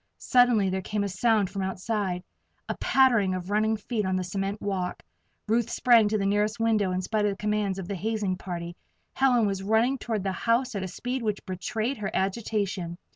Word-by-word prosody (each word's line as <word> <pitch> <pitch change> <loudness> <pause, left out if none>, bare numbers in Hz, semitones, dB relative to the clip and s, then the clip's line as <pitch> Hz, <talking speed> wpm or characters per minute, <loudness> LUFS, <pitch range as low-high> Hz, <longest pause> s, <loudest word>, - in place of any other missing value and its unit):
Suddenly 240 -6 +3
there 190 0 -1
came 205 +2 -2
a - - -1
sound 200 0 +1
from 195 -1 -3
outside 190 -1 -2 0.4
a - - -2
pattering 230 -8 +3
of 185 +1 -5
running 220 +1 +2
feet 215 +1 -2
on 190 -1 0
the 185 - 0
cement 195 +3 -3
walk. 190 -3 -3 0.4
Ruth 230 +1 +1
sprang 235 -4 +5
to 215 +1 +1
the 195 - -1
nearest 210 +3 +1
window 220 -4 +2
in 185 0 -1
spite 210 +2 0
of - - +3
the - - -11
commands 210 -2 -1
of 190 -3 -5
the 200 - -3
hazing 205 0 -1
party. 175 -2 -6 0.4
Helen 250 -4 +3
was 195 -2 -1
running 225 +6 +2
toward 220 -4 -2
the 195 - -1
house 235 +6 +1
at 200 - -3
a 190 - -3
speed 250 +7 -4
which 210 -3 -2
betrayed 215 +7 -2
her 205 -2 -3
agitation. 190 -3 -1
205 Hz, 200 wpm, -27 LUFS, 190-225 Hz, 0.4 s, sprang